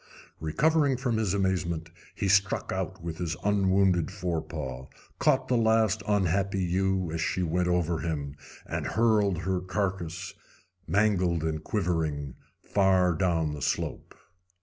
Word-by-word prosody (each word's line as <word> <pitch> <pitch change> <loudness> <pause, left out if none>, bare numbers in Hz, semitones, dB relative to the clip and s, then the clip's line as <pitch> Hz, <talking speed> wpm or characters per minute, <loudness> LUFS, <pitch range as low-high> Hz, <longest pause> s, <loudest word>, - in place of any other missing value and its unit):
Recovering 140 - +2
from 125 -3 -1
his 105 -3 0
amazement, 85 -4 -1 0.2
he 100 - -1
struck 100 0 +2
out 95 -2 -4
with 85 -1 -5
his 85 -3 -2
unwounded 95 -3 +2
forepaw, 80 -8 -4 0.3
caught 130 0 +2
the 125 - +2
last 110 -2 +3
unhappy 100 -1 +1
ewe 95 -1 0
as 80 0 -2
she 90 +2 0
went 90 +2 0
over 90 -2 +1
him, 75 -4 -3 0.3
and - - -3
hurled 105 -5 +2
her 95 -1 0
carcass, 90 -2 -3 0.5
mangled 90 -3 +2
and 80 -1 -2
quivering, 80 - -1 0.3
far 95 -3 +3
down 80 -2 0
the 75 - -7
slope. - - -3
90 Hz, 130 wpm, -28 LUFS, 85-100 Hz, 0.5 s, last